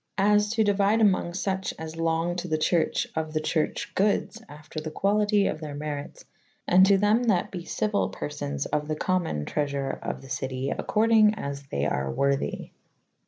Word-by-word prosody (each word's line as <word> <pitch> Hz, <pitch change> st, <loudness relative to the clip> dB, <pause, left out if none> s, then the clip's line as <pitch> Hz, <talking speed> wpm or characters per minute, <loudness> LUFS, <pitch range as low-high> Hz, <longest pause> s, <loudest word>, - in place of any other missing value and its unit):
As 210 Hz, +1 st, +3 dB
to 225 Hz, -2 st, +3 dB
deuyde 205 Hz, +1 st, +2 dB
amonges 185 Hz, -3 st, +2 dB
fuche 190 Hz, -1 st, -1 dB
as 160 Hz, 0 st, -7 dB
longe 165 Hz, +1 st, 0 dB
to 180 Hz, -, -7 dB
the 155 Hz, -2 st, 0 dB
churche 160 Hz, +2 st, +1 dB
of 155 Hz, -1 st, -3 dB
the 155 Hz, -, +1 dB
churche 155 Hz, 0 st, -2 dB
goodes 210 Hz, +3 st, 0 dB
after 150 Hz, +1 st, -8 dB
the 155 Hz, -, -5 dB
qualyte 205 Hz, +4 st, +2 dB
of 155 Hz, -, -3 dB
theyr 150 Hz, -2 st, -6 dB
merytes, 145 Hz, -1 st, -6 dB, 0.4 s
and 185 Hz, +1 st, +6 dB
to 200 Hz, 0 st, +5 dB
them 210 Hz, +4 st, +3 dB
that 195 Hz, -6 st, +1 dB
be 180 Hz, -, -5 dB
cyuyle^ 210 Hz, -1 st, -1 dB
perfones 70 Hz, -, -4 dB
of 150 Hz, 0 st, 0 dB
the 155 Hz, -, -1 dB
commune 165 Hz, -, -1 dB
tresour 140 Hz, -2 st, -2 dB
of -, -, -5 dB
the -, -, -11 dB
cyte 130 Hz, +1 st, -3 dB
accordynge 220 Hz, -1 st, +3 dB
as 140 Hz, -2 st, -5 dB
they 70 Hz, -, -2 dB
are 65 Hz, -2 st, -1 dB
worthy. 140 Hz, -, -1 dB
165 Hz, 175 wpm, -26 LUFS, 145-200 Hz, 0.4 s, and